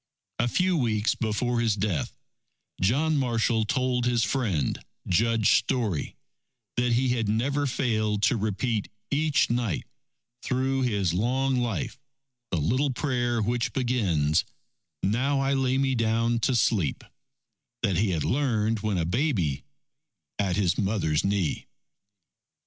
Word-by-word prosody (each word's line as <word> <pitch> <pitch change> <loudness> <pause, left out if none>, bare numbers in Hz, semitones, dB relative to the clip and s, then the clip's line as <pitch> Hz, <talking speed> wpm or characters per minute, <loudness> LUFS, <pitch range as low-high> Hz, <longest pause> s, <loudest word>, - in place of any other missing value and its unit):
A 120 - +2
few 185 +8 +1
weeks 110 -5 +1
before 120 +2 -1
his 115 -3 +2
death, 100 -7 -2 0.7
John 145 +11 +2
Marshall 115 -3 +1
told 125 0 0
his 120 -2 +2
friend, 100 - -1 0.2
Judge 110 +4 +3
Story, 110 - -2 0.6
that 120 0 +1
he 125 +2 +2
had 115 -4 0
never 140 +7 0
failed 110 -5 0
to - - +4
repeat 110 +1 -1 0.2
each 145 -3 +2
night, 120 -8 -1 0.6
through 130 +1 0
his 100 -9 0
long 130 +7 +1
life, 120 - -2 0.5
the 90 - -1
little 130 - +1
prayer 120 -3 0
which 120 +1 -1
begins: 95 - +1 0.6
Now 130 +8 +1
I 135 0 +1
lay 130 -1 +1
me 135 -1 +1
down 115 0 +1
to 125 +3 +1
sleep, 100 - +1 0.8
that 100 -6 +1
he 105 +2 +2
had 80 -5 -1
learned, 115 -5 +1
when 105 -2 -1
a 85 - 0
baby, 90 - 0 0.7
at 95 -3 +1
his 95 -4 +1
mother's 95 -7 0
knee. 100 -5 -1
115 Hz, 130 wpm, -26 LUFS, 100-130 Hz, 0.8 s, to